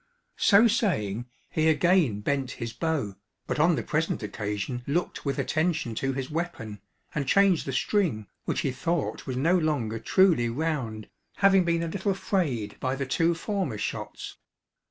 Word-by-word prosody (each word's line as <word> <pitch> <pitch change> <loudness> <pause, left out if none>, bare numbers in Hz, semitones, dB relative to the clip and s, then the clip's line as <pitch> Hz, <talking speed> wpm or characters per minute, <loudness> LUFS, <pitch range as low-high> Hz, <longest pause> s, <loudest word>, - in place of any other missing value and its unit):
So 210 +3 +6
saying, 120 - 0 0.2
he 155 0 +2
again 155 - +3
bent 135 +2 -1
his 115 0 -5
bow, 145 - -2 0.3
but - - -2
on 165 +2 +4
the - - -2
present 155 -5 -1
occasion 105 +3 -3
looked 165 +3 -2
with 140 - -1
attention 160 -7 0
to 135 +4 -1
his 130 +1 -4
weapon, 115 - -4 0.3
and 140 -3 -2
changed 195 -2 +4
the - - -1
string, 130 - 0 0.2
which - - -1
he 135 - 0
thought 165 +4 -2
was 130 -1 -3
no 165 +7 +3
longer 145 -10 0
truly 165 - +3
round, 120 -6 -2 0.3
having 195 -2 +4
been 170 0 +1
a - - -2
little 195 +3 -1
frayed 135 - -1
by 130 0 -1
the 135 0 -3
two 165 +6 +2
former 180 - -2
shots. 100 - -5
150 Hz, 160 wpm, -27 LUFS, 120-175 Hz, 0.3 s, So